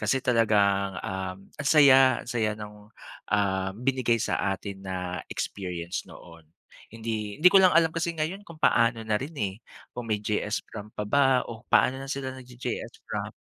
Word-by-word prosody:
kasi 105 +5 +1
talagang, 100 -5 +2
um, 95 -1 -4 0.2
ang 145 - 0
saya, 135 -4 +6
ang - - -13
saya 110 -3 0
nung, 105 0 -11 0.4
ah, 95 -2 0
binigay 125 -1 +1
sa 100 -3 0
atin 100 -2 -8
na 90 -2 -4
experience 90 -3 -4
noon. 85 -2 -14 0.4
Hindi, 110 -2 -4
hindi 180 +4 +7
ko 195 - +8
lang 185 -3 +5
alam 165 -1 +4
kasi 165 0 -2
ngayon 160 +6 -2
kung 170 - -11
paano 115 -1 +3
na 110 -1 +1
rin, 150 +4 -6
eh, 100 -6 -2 0.4
kung 120 -1 -7
may 105 -1 -1
JS 105 +1 -1
prom 105 -1 -9
pa 105 -1 -5
ba 130 +3 +3
o 115 0 -10
paano 130 +1 +3
na 135 - -8
sila 135 -1 -3
nag-j-JS 125 -2 -7
prom? - - -4
110 Hz, 175 wpm, -27 LUFS, 100-130 Hz, 0.4 s, ko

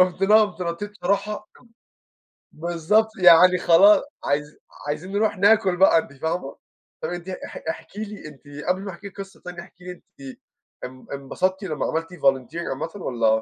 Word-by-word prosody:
رُحت 185 +1 +2
نا 210 +2 +6
قومت 205 -4 +2
نطيت 175 +4 -4
بصراحة 205 +1 -2 1.0
بالضبط، 175 +7 +1
يعني 180 0 +7
خلا 195 +9 +5 0.2
عايز 150 +1 -2 0.3
عايزين 165 +6 -4
نِرُوح 205 -1 0
ناكل 200 -2 +4
بقى 190 -2 +6
أنتِ 160 -3 -2
فاهمة؟ 160 0 -4 0.5
طيّب 160 - -3
أنتِ 175 +1 -7
اح 185 - -8
احكي 215 -1 -6
لي 210 -6 -9
أنتِ 145 -1 -15 0.2
قبل 185 +1 +1
ما 195 - -6
أحكي 195 +3 -10
لِك 195 - -14
قصّة 195 0 -12
تانية، 180 -1 -7
احكي 180 - -17
لي 180 - -6
أنتِ 135 -6 -12 0.5
ان 130 0 -12
انبسطتِ 185 +8 -2
لمّا 155 -6 -3
عملتِ 165 +1 -2
Volunteering 140 +1 0
عامةً 135 +5 -4
والّا؟ 120 - -1
180 Hz, 165 wpm, -23 LUFS, 155-200 Hz, 1.0 s, يعني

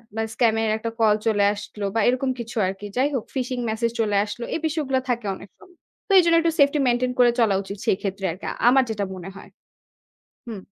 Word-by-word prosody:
মানে 225 0 -1
scam 225 -1 +3
এর 220 - 0
একটা 230 +1 -4
call 215 -2 +4
চলে 210 -3 +2
আসলো 210 0 -7
বা - - +2
এরকম 255 +2 +1
কিছু 235 0 -7
আরকি। 195 +2 -6
যাই 265 +3 +3
হোক, 255 -5 -1
phishing 255 -1 -2
message 230 +1 -1
চলে 210 -2 0
আসলো। 225 +3 -7
এই - - -1
বিষয়গুলো 290 -4 -1
থাকে 235 -3 -1
অনেক 200 - -13
সময়। 365 -3 -20 0.3
তো - - -5
এইজন্য 335 -2 +4
একটু 330 0 +1
safety 285 +1 +4
maintain 245 +1 +1
করে 245 -1 +6
চলা 220 -4 +3
উচিত 200 +1 -8
সেই - - +2
ক্ষেত্রে 195 -1 -4
আরকি, 185 - -9 0.2
আমার 265 +1 +5
যেটা 205 -2 -2
মনে 185 +1 -8
হয়। 195 - -12 1.0
হুম। 215 -5 -7
230 Hz, 210 wpm, -23 LUFS, 210-260 Hz, 1.0 s, করে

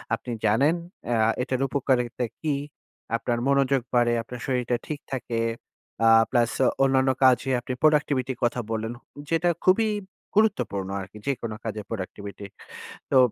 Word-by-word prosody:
আপনি 120 +2 -8
জানেন 140 +10 +4 0.3
অ্যা 115 -2 +2
এটার 130 0 -1
উপকারিতা 125 -3 0 0.2
কি, 155 -3 0 0.6
আপনার 120 +1 -1
মনোযোগ 140 -1 +3
বাড়ে, 120 -1 +4
আপনার 120 +2 -8
শরীরটা 125 -2 0
ঠিক 150 -2 -4
থাকে। 120 -3 -2 0.7
আ - - +7 0.2
প্লাস 120 -2 +3 0.3
অন্যান্য 135 0 +3
কাজে 130 +1 +4
আপনি 125 +1 -5
প্রোডাক্টিভিটির 145 -4 +2
কথা 120 +1 +1
বললেন 110 +1 -2 0.4
যেটা 165 +1 +2
খুবই 205 +4 +4 0.5
গুরুত্বপূর্ণ 125 - +1
আরকি 95 +2 -10
যেকোনো 120 -5 -2
কাজে 110 -1 -4
প্রোডাক্টিভিটি। 100 -1 -6 0.7
তো - - +5
125 Hz, 130 wpm, -25 LUFS, 115-135 Hz, 0.7 s, আ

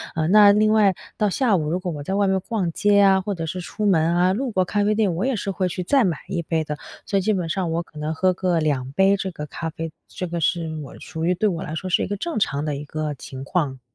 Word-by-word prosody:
呃， 160 -1 0
那 205 +1 +7
另 215 +1 +3
外 205 -3 +4 0.2
到 210 - +2
下 225 0 +2
午， 155 -3 -1
如 175 +3 0
果 180 -3 -4
我 145 -1 -6
在 190 - -3
外 200 -1 +2
面 190 0 +1
逛 195 -3 -2
街 205 +2 +3
啊， 195 -1 +5
或 200 +1 -3
者 165 -3 -4
是 180 +3 -4
出 210 +4 -4
门 170 -4 +3
啊， 180 +2 +3
路 255 +3 -2
过 185 -3 +1
咖 205 +2 0
啡 210 +1 +2
店， 205 -6 +1
我 185 - -1
也 270 - +1
是 200 - -3
会 185 0 -1
去 180 +1 -4
再 265 +7 +3
买 170 -6 0
一 185 -3 -2
杯 160 -1 -1
的， 150 0 -4 0.3
所 200 - 0
以 195 - +2
基 215 +3 +1
本 180 -4 -1
上 170 0 -1
我 170 +1 0
可 155 - -18
能 150 +1 -2
喝 185 +3 +2
个 180 -2 0
2 135 -4 -1
杯 195 +6 +4
这 190 -1 -3
个 150 -2 -6
咖 160 +2 -5
啡， 165 -1 -6 0.2
这 180 - -5
个 170 0 -3
是 165 +1 +1 0.2
我 - - -11
属 160 -1 -6
于 180 +2 +3
对 205 +4 +1
我 175 -5 -2
来 155 - -6
说 185 +4 -4
是 180 - +2
一 - - -2
个 205 - -3
正 335 - -3
常 145 -7 0
的 150 - -1
一 145 - -6
个 155 0 -3
情 135 0 -9
况。 140 -5 -1
180 Hz, 310 characters per minute, -23 LUFS, 160-200 Hz, 0.3 s, 那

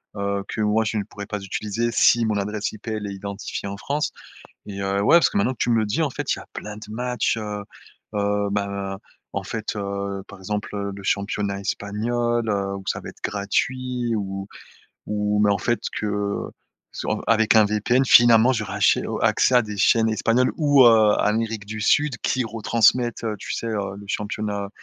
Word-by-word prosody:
heu, 100 -1 -2
que 110 - -3
moi, 105 +1 +2
je 110 0 -2
ne 105 - 0
pourrais 100 0 -9
pas 105 0 -4
utiliser 105 +4 -2
si 115 +1 +4
mon 105 -1 0
adresse 105 +1 -2
IP, 110 +2 -13
elle 110 -2 -3
est 100 - -5
identifiée 100 +1 -5
en 100 0 -5
France. 145 +8 -2 0.5
Et 100 -1 -6
heu, 100 0 0
ouais, 165 - +7
parce 155 -7 +4
que - - -2
maintenant 120 +6 +2
que - - -20
tu - - +1
me 115 - +4
le 110 - +2
dis, 105 +10 -1
en 155 - +1
fait, - - -2
il - - -9
y - - -9
a - - -15
plein 105 0 -7
de 105 0 -10
matches, 125 0 -1
heu 105 -1 -4 0.5
heu, 100 0 0
ben, 100 -1 -2 0.4
en 100 - -2
fait, 110 +2 -4
heu, 100 -1 -4
par 100 - -12
exemple, 105 +2 -4
heu, 100 0 -3
le 100 - -10
championnat 100 0 -1
espagnol, 115 +4 -1
heu, 100 -1 -1
où 95 - -8
ça - - -1
va - - -8
être - - -16
gratuit, 120 +4 -1
ou 95 -1 -4 0.6
ou 105 0 0
mais 105 - +4
en 100 - +3
fait, 120 +3 0 0.2
que 105 -1 -2 0.4
sur - - -3
avec 110 -1 +4
un 110 - +7
VPN, 105 +5 +2
finalement, 120 0 +7
j'aurais 110 -5 -3
achè 100 - +3
heu, - - -3
accès 130 - +3
à 125 - +6
des 105 -1 -7
chaînes 115 +2 +4
espagnoles 115 +3 +2
ou, 145 -4 +6
heu, 110 -3 +6
Amérique 110 0 0
du 110 +1 -6
Sud, 145 +5 +2
qui 130 -2 0
retransmettent, 115 +2 +2
heu, 110 -1 -1
tu - - -8
sais, - - -4
heu, 100 -3 -3
le 100 - -10
championnat 105 -1 -3
105 Hz, 210 wpm, -23 LUFS, 100-115 Hz, 0.6 s, ouais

